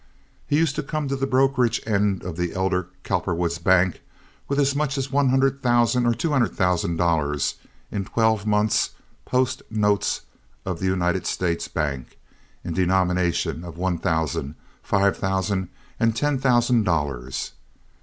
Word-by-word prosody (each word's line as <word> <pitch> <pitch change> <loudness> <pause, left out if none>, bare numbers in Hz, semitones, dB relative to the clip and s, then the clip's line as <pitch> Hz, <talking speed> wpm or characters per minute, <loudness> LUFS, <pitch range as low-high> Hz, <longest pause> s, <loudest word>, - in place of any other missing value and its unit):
He 145 - +2
used 160 -3 +2
to - - +1
come 150 0 -3
to 135 - 0
the 135 0 -1
brokerage 130 -3 +2
end 100 -3 +1
of 90 -2 -5
the 90 0 -2
elder 95 -1 0 0.2
Cowperwood's 85 -1 -1
bank, 90 0 +3 0.5
with 140 - -1
as 140 -1 +2
much 145 -1 0
as 135 0 -3
one 140 -1 +3
hundred 135 +1 +2
thousand 120 0 +3
or 120 - +2
two 165 - -1
hundred 130 -5 +1
thousand 90 -2 +1
dollars, 80 -4 +1 0.4
in 100 -2 -2
twelve 110 -1 +1
months—post 115 +4 0
notes 105 -2 +1 0.4
of 90 -3 -3
the 95 - -1
United 90 -2 0
States 85 -2 -1
Bank 70 -5 -3 0.5
in 85 - -4
denominations 90 -2 +1
of 85 -1 -9
one 90 -1 -1
thousand, 80 -3 -1 0.3
five 100 -3 +2
thousand, 95 -1 -1 0.3
and 115 -1 +2
ten 145 +2 0
thousand 120 -3 +3
dollars. 70 -8 -2
100 Hz, 150 wpm, -23 LUFS, 85-125 Hz, 0.5 s, bank